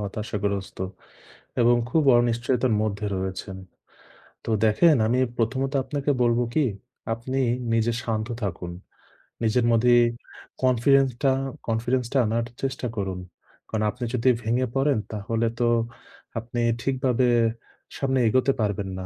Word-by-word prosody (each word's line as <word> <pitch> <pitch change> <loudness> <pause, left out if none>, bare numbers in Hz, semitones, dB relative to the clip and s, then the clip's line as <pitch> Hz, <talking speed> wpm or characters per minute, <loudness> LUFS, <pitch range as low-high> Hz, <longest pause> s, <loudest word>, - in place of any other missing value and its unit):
হতাশাগ্রস্ত 100 -1 -3 0.8
এবং 120 0 +5
খুব 160 -2 +3 0.2
অনিশ্চয়তার 120 +1 +1
মধ্যে 105 -1 -2
রয়েছেন। 95 +1 -4 0.9
তো - - -6 0.2
দেখেন 145 +9 +5
আমি 125 +3 +2 0.2
প্রথমত 130 +4 0
আপনাকে 145 +1 -1
বলব 120 -1 +3
কি 155 - +3 0.5
আপনি 130 +4 -3 0.3
নিজে 115 +1 +2
শান্ত 110 -2 -2 0.2
থাকুন। 90 -3 -4 0.7
নিজের 115 +2 +2
মধ্যেই 120 +1 +5 0.6
confidence 130 +1 +4
টা 135 - +5 0.4
confidence 120 +2 0
টা 140 - +2
আনার 115 +2 0 0.2
চেষ্টা 130 -2 -2
করুন। 95 -3 -3 0.5
কারণ 110 -1 -2
আপনি 125 - -8
যদি 125 +1 +2
ভেঙে 120 +3 +1
পড়েন 135 0 +2
তাহলে 115 +2 -1
তো 120 - +2 0.7
আপনি 120 +1 -5 0.2
ঠিকভাবে 130 -2 +1 0.7
সামনে 135 -1 0
এগোতে 130 +4 +3
পারবেন 100 -2 -1
না। 95 - -5
120 Hz, 125 wpm, -25 LUFS, 110-130 Hz, 0.9 s, এবং